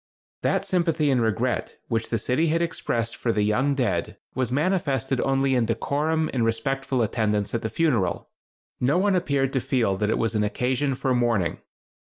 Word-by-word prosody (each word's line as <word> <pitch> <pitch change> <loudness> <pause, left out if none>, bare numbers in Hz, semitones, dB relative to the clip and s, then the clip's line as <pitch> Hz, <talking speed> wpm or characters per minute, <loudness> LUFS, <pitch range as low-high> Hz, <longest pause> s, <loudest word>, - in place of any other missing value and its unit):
That - - +1
sympathy 165 -5 +1
and 125 -2 +2
regret 115 +3 -1
which 115 -1 -1
the 115 - 0
city 125 +9 +1
had 165 +2 +2
expressed 115 -8 -2
for 115 - -1
the 105 -2 +1
young 125 +7 +1
dead 100 -11 -1 0.2
was 130 -2 -1
manifested 140 -4 0
only 135 0 +1
in 120 -3 +2
decorum 150 +7 0
and 125 -3 +1
respectful 125 +3 0
attendance 105 -2 0
at 115 - -1
the 110 - -2
funeral. 115 - 0 0.5
No 135 +6 +2
one 195 +1 +2
appeared 140 -6 0
to 130 - +1
feel 115 -8 +1
that 105 +1 0
it - - +1
was 115 0 0
an 105 -1 +1
occasion 130 +6 0
for 130 0 0
mourning. 115 -9 +1
125 Hz, 175 wpm, -25 LUFS, 115-140 Hz, 0.5 s, and